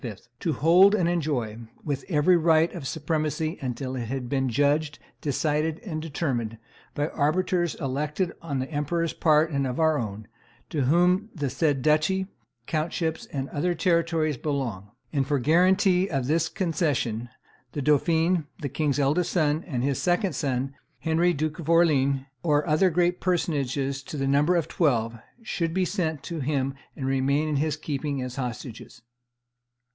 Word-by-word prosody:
"to 165 - -1
hold 180 +9 +6
and 180 -5 +1
enjoy 145 -11 -1 0.3
with 140 -3 -3
every 165 +2 +4
right 165 0 +3
of 160 -7 -5
supremacy 155 +2 -2
until 130 0 -3
it 120 -2 -3
hath 130 0 -3
been 135 0 0
judged, 145 +4 +1 0.2
decided, 150 +2 0
and 155 -6 -4
determined, 130 -8 -2 0.4
by 145 +1 0
arbiters 175 +3 0
elected 150 +6 -2
on 150 -5 -3
the 130 +1 -3
emperor's 160 +3 -1
part 155 0 +3
and 140 -2 0
our 155 +4 +2
own, 105 -2 -5 0.4
to 145 -5 0
whom 180 - +3
the 145 -5 -2
said 140 -2 +1
duchy, 155 +5 +2 0.4
countships, 160 +1 -2
and 135 -1 -3
other 175 +4 -1
territories 165 -4 +1
belong.... 120 -9 -3 0.2
And 135 -3 +1
for 145 - +1
guarantee 180 - +3
of 135 -8 -1
this 160 +4 +1
concession, 145 - -1 0.4
the 145 - -3
dauphin, 160 +3 +2
the 145 -4 -3
king's 145 +1 0
eldest 150 +5 +2
son, 155 -1 +1
and 125 -7 -2
his 140 0 0
second 180 0 +1
son, 135 0 -2 0.2
Henry, 165 +2 +2
Duke 155 +1 -2
of 165 -1 -6
Orleans, 140 -5 +4 0.2
or 150 -2 +2
other 155 +5 +4
great 175 +1 +1
personages, 140 -6 -1
to 145 +2 -7
the 135 -1 -1
number 145 +6 +3
of 170 -3 +1
twelve, 115 -8 0 0.2
should 165 -6 -2
be 190 -1 +2
sent 160 -6 -2
to 170 -2 -5
him 135 -1 -1 0.2
and 135 - -5
remain 135 +3 +1
in 150 -2 0
his 155 +1 0
keeping 145 -2 -3
as 125 0 -6
hostages." 125 -2 -6
150 Hz, 155 wpm, -26 LUFS, 135-165 Hz, 0.4 s, hold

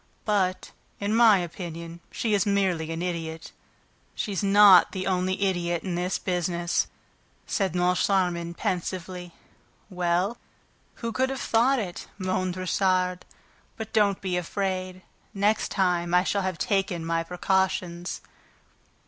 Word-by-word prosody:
But, 185 -3 0 0.3
in 205 +2 0
my 225 -3 +7
opinion, 170 -1 -6
she 220 -2 -1
is 200 -2 +3
merely 190 -6 0
an 165 +1 -3
idiot." 165 -2 -4 0.6
"She's 200 -4 -2
not 200 -2 +7
the 185 -1 -3
only 185 0 0
idiot 175 -3 0
in 185 - -3
this 180 +2 -1
business," 175 -1 -1 0.6
said 190 -4 -1
Moncharmin 180 -1 +1
pensively. 180 0 -3 0.6
"Well, 180 +5 0 0.7
who 230 - -1
could 260 +3 0
have 270 -1 -4
thought 245 +5 +3
it?" 190 -7 -5
moaned 185 -1 -1
Richard. 185 0 0 0.5
"But 220 -2 -7
don't 205 -3 +2
be 185 -2 -1
afraid... 185 0 -3 0.3
next 205 +2 +1
time, 180 -2 +1
I 180 - +5
shall 200 +1 0
have 185 -2 -2
taken 190 0 0
my 165 0 0
precautions." 180 0 -1
185 Hz, 125 wpm, -26 LUFS, 175-195 Hz, 0.7 s, my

